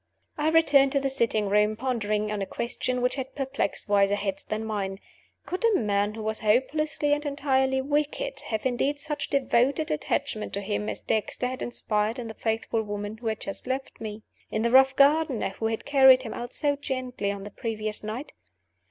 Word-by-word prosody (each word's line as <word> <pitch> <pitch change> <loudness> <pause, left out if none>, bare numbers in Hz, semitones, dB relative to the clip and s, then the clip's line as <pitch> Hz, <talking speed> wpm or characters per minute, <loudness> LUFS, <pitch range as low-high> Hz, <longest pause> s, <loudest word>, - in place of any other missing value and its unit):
I 300 +1 +1
returned 285 -4 +5
to 280 - +3
the 275 0 -1
sitting 230 -5 +1
room, 210 +2 +3
pondering 215 -4 -1
on 210 -1 -2
a 195 - -2
question 250 +1 -2
which 250 - +2
has 265 -1 -3
perplexed 270 -6 -2
wiser 200 -1 +3
heads 195 -1 -3
than 215 +1 -3
mine. 200 -3 -3 0.5
Could 365 +5 -4
a 455 -3 +4
man 205 -1 0
who 220 - -6
was 220 0 -2
hopelessly 290 +7 +1
and 295 0 0
entirely 265 -2 +1
wicked 300 - -1
have 220 +1 -3
inspired 260 +3 +1
such 295 0 -3
devoted 275 +2 +2
attachment 210 +7 -2
to 200 - -2
him 210 +1 -2
as - - -3
Dexter 220 +3 -1
had 255 +1 -3
inspired 215 -1 -1
in 240 -2 -5
the 220 - -6
faithful 225 0 -1
woman 205 0 -5
who 230 0 -6
had 220 -1 -1
just 195 - -6
left 260 -1 -4
me? 215 0 -6 0.3
in 220 - -1
the 235 - +1
rough 265 +1 +6
gardener 285 -5 +3
who 220 +3 -3
had 225 0 -3
carried 265 -2 +7
him 225 - -5
out 240 +1 -6
so 290 -2 0
gently 255 -7 -3
on 200 -1 -6
the 205 - -8
previous 215 -1 -4
night? 225 +7 -5
235 Hz, 195 wpm, -27 LUFS, 210-275 Hz, 0.5 s, carried